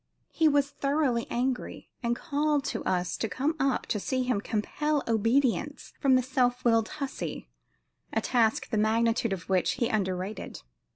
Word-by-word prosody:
He 320 - +3
was 285 -1 +2
thoroughly 275 -5 0
angry, 250 +1 -3
and 235 -1 0
called 295 +2 0
to - - -3
us 180 -1 0
to 225 - -2
come 280 - -1
up 270 -2 +1
to 210 - -1
see 255 +5 -1
him 250 -5 0
"compel 290 +8 -1
obedience 245 +5 +1
from 270 -2 +4
the 255 - +3
self 250 -1 0
willed 225 -2 +3
hussy," 275 -2 -5 0.6
a - - +1
task 230 -2 +1
the 220 - +1
magnitude 230 +1 +2
of 185 -3 -4
which 185 -2 +2
he 240 -2 0
underrated. 190 - -3
245 Hz, 160 wpm, -28 LUFS, 220-275 Hz, 0.6 s, from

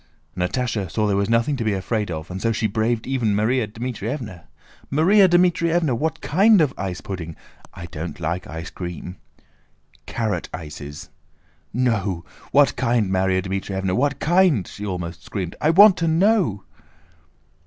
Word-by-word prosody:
Natásha 100 +1 -1
saw 110 +5 0
there 100 -1 +1
was 100 +1 0
nothing 115 +5 +2
to 120 - -2
be 110 -2 +1
afraid 105 +2 -2
of 80 +1 -6
and 95 +1 -5
so 115 - +1
she 110 0 -1
braved 110 +2 0
even 125 -6 0
Márya 110 +3 +1
Dmítrievna. 115 - -5 0.5
"Márya 185 +7 +5
Dmítrievna! 170 -4 +2
What 160 +5 -2
kind 200 +6 +4
of 150 -5 +2
ice 95 -1 -4
pudding? 85 -4 -6 0.4
I 90 -2 -7
don't 85 +1 -7
like 85 +2 -3
ice 80 0 -7
cream." 90 0 -7 0.9
"Carrot 110 -2 -2
ices." 75 -3 -9 0.6
"No! 105 -8 -1 0.3
What - - +4
kind, 115 -5 +1
Márya 95 0 +1
Dmítrievna? 95 0 -2
What 140 +2 0
kind?" 170 - +3
she 105 0 -7
almost 90 -3 -5
screamed; 90 -4 -5
"I 150 - +3
want 195 +4 +7
to 165 - 0
know!" 165 - +2
110 Hz, 150 wpm, -22 LUFS, 95-140 Hz, 0.9 s, want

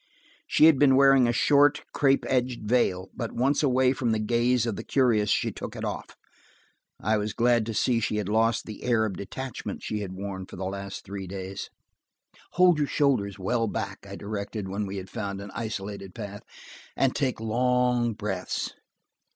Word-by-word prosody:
She - - +5
had 160 -4 +6
been 135 -2 +6
wearing 135 -2 +6
a - - +3
short, 145 +4 +4
crepe 135 -1 +3
edged 125 -3 0
veil, 95 -6 +1
but 115 -3 -5
once 135 +4 +2
away 130 -2 +3
from 120 -4 0
the - - +1
gaze 120 +2 +2
of 115 -3 -2
the 110 - -6
curious, 115 -7 +2
she - - +1
took - - -7
it - - -4
off. - - -5 0.8
I 110 +2 +1
was 105 0 -2
glad 120 -2 +2
to 115 - -3
see 120 +1 +2
she 110 - -1
had 105 -3 -2
lost 115 +2 +2
the 110 - -8
air 115 -3 +2
of 105 - -3
detachment 130 +5 -6
she 105 - -3
had 100 -3 -5
worn 95 -1 -6
for - - -10
the 95 - -4
last 100 +1 -6
three 100 -1 -6
days. 95 +1 -6 0.8
"Hold 180 -3 +5
your 145 - +1
shoulders 125 -11 +1
well 115 +5 0
back," 100 -2 -4
I 100 - -6
directed, 100 0 -5
when 100 +2 -3
we 100 +1 -5
had 95 0 -6
found 100 0 -4
an 100 0 -8
isolated 100 -4 -5
path, 100 0 -7 0.6
"and 135 -1 +2
take 130 -5 0
long 125 +1 +1
breaths. 100 -4 -3
110 Hz, 185 wpm, -27 LUFS, 100-125 Hz, 0.8 s, had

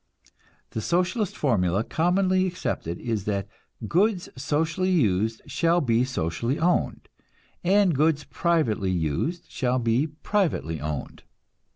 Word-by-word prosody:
The 110 - -3
Socialist 185 - 0
formula 100 - +1
commonly 185 +5 +2
accepted 85 - -3
is 110 -5 -2
that 100 -2 -1 0.4
"goods 190 - +1
socially 160 +7 0
used 110 - +1
shall 170 +1 +2
be 120 -6 +2
socially 115 - -2
owned, 175 +2 0 0.6
and 190 0 +4
goods 150 +1 +2
privately 150 - 0
used 90 - -1
shall 125 0 -1
be 120 +4 +1
privately 155 - -1
owned." 75 -2 -5
145 Hz, 110 wpm, -25 LUFS, 105-175 Hz, 0.6 s, and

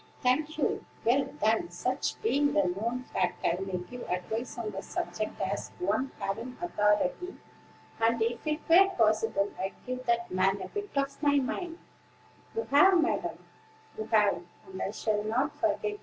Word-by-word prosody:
"Thank 300 +5 +2
you: - - 0 0.2
well, 265 +4 +3 0.2
then, 220 -5 +2
such 250 +9 -2
being 290 -9 +2
the 300 - +4
known 230 +8 -1
fact, - - 0
I 175 +2 +1
may 190 -1 -2
give 180 +8 -8
advice 220 +8 -3
on 225 -3 -3
the - - -5
subject - - -4
as - - -2
one 275 -7 0
having 230 +6 -4
authority; 210 - +1 0.6
and, 230 +1 +3
if 230 +6 -1
it 305 0 0
were 375 +4 +7
possible, 215 -2 +2
I'd 190 +1 -2
give 255 0 -5
that 235 0 +1
man 190 +2 +2
a - - -6
bit 410 -1 -4
of 275 0 -1
my 285 -1 +4
mind." 330 +5 -1 0.8
"You 455 - 0
have, 360 +6 +7
madam, 325 - -1 0.5
you 220 - -4
have; 210 -5 +3 0.2
and 190 0 -8
I - - -1
shall 210 0 -1
not 245 +7 0
forget - - 0
it. 415 - -9
235 Hz, 170 wpm, -30 LUFS, 210-285 Hz, 0.8 s, were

